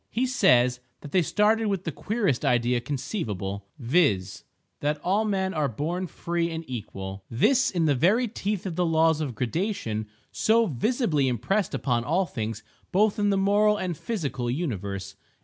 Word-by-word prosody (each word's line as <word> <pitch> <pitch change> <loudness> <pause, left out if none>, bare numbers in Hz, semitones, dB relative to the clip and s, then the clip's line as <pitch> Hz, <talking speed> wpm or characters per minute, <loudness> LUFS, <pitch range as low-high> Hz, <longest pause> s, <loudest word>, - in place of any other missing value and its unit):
He 245 +3 0
says 125 - +3 0.2
that 145 - -9
they 185 - +4
started 215 +6 +2
with 195 -3 -1
the 165 - -3
queerest 200 - -1
idea 120 0 +2
conceivable, 110 - -4
viz: 115 - +1 0.4
that 150 +1 -1
all 200 +5 +2
men 190 -2 0
are 155 -3 +1
born 165 - -3
free 170 0 -2
and 165 0 -5
equal—this 110 - 0
in 170 -3 0
the 150 - +4
very 195 - +3
teeth 205 -2 -3
of 180 -4 -3
the 180 - +1
laws 160 -1 +3
of 135 -6 -3
gradation 120 - -2 0.2
so 230 +1 +3
visibly 165 - +1
impressed 130 - 0
upon 120 -3 0
all 175 +8 +1
things 110 - -5 0.3
both 210 +2 +2
in 205 0 +2
the 200 - +2
moral 205 +2 +3
and 180 -4 -2
physical 150 - -3
universe. 100 - -3
160 Hz, 160 wpm, -26 LUFS, 120-200 Hz, 0.4 s, they